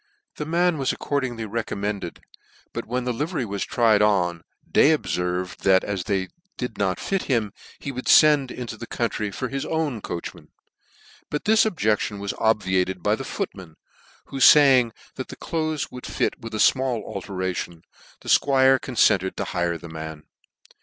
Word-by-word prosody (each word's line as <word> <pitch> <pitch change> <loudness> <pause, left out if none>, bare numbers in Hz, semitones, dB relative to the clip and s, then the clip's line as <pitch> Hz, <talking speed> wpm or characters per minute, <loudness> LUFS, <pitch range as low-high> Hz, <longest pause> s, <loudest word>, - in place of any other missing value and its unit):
The 150 - -4
man 170 -1 +2
was 135 - +1
accordingly 125 -6 -2
recommended, 105 -4 -4 0.5
but - - -5
when 125 +2 -2
the 125 0 -1
livery 150 +1 -2
was 100 -2 -3
tried 110 -3 +3
on, 90 -5 +2 0.3
Day 155 +1 +5
obferved 90 -5 -3
thac 95 -1 +4
as 100 -4 -3
they 95 -2 -1 0.3
did 125 -3 -5
not 95 -2 0
fit 195 -1 -2
him, 115 -7 0 0.2
he 140 - -5
would 130 -1 -5
fend 150 -4 +6
into 120 -3 -6
the 120 - -8
country 110 -3 -2
for 125 +6 -4
his 135 +1 -3
own 155 -8 -2
coachman; 85 - -7 0.8
but 150 - -3
this 220 +1 +5
objec 110 - +1
tion 105 - -4
was 100 0 -3
obviated 95 -4 +1
by - - +2
the - - -3
footman, 90 -5 -6 0.5
who 135 - -7
faying 135 -4 +7 0.3
that - - -5
the - - -9
cloaths 155 -2 -3
would 125 - -8
fit - - 0
with 115 -2 -7
a - - -1
1mall 130 0 +2
alteration, 90 -3 -4 0.4
the - - -8
Squire 135 -1 +5
ccnfented 100 -6 +2
to - - -2
hire 85 -1 -1
the 85 - -11
man. 80 -1 -8
115 Hz, 165 wpm, -24 LUFS, 95-135 Hz, 0.8 s, faying